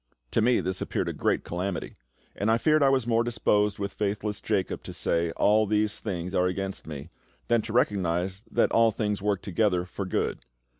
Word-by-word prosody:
To - - +2
me 120 +2 +3
this 95 0 -3
appeared - - -1
a - - -3
great - - 0
calamity, 90 0 -4 0.4
and 100 - 0
I 115 - +4
fear 155 +3 +3
I 135 - +5
was 135 -3 +2
more 115 -1 +2
disposed 105 -3 +1
with 100 -1 -4
faithless 105 0 -2
Jacob - - -1
to - - -8
say, 85 0 0
"All 105 +1 +4
these 105 0 +1
things 90 -3 -4
are 90 -1 +3
against 95 0 -4
me," 75 -3 -7 0.4
than 120 -1 +4
to 110 - -7
recognise 95 -4 +1
that - - +2
"All 115 0 +5
things 105 -2 -2
work 100 -2 0
together 90 -2 +1
for 95 +2 -5
good." - - -1
105 Hz, 195 wpm, -27 LUFS, 95-110 Hz, 0.4 s, I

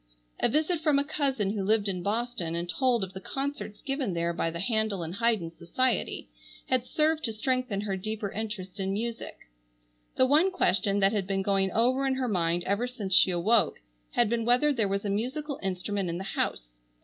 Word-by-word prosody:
A - - +3
visit 315 +3 +1
from 300 -3 +3
a 280 - +3
cousin 275 -9 0
who 205 -2 -2
lived 210 +1 +2
in 185 -2 -2
Boston 205 -4 -2
and 170 +1 -2
told 245 +2 +1
of 190 0 -6
the 190 - -7
concerts 270 -3 -4
given 270 - -2
there 170 0 0
by 165 0 -1
the 170 +1 -5
Handel 220 -3 0
and 165 +1 -5
Haydn 220 -6 +1
Society 225 +8 -1 0.4
had 255 -1 +1
served 315 0 +1
to 225 - 0
strengthen 250 -2 -1
her 205 -2 -2
deeper 210 +1 -3
interest 205 -3 -5
in 195 0 -1
music. 230 +3 -4 0.8
The 260 - +4
one 305 +8 +4
question 200 - +1
that 195 0 +5
had 200 -3 -1
been 195 0 0
going 195 -1 +1
over 255 +6 +2
in 265 - +1
her 260 -1 -1
mind 175 -4 +1
ever 200 +7 0
since 215 -7 -4
she 185 - +7
awoke 200 +6 +2 0.3
had 240 - +3
been 230 +1 0
whether 250 +6 +3
there 225 -6 +1
was 200 +1 -2
a - - 0
musical 270 +7 -2
instrument 190 0 -2
in 170 - -2
the 190 - -5
house. - - -3
215 Hz, 200 wpm, -28 LUFS, 190-255 Hz, 0.8 s, she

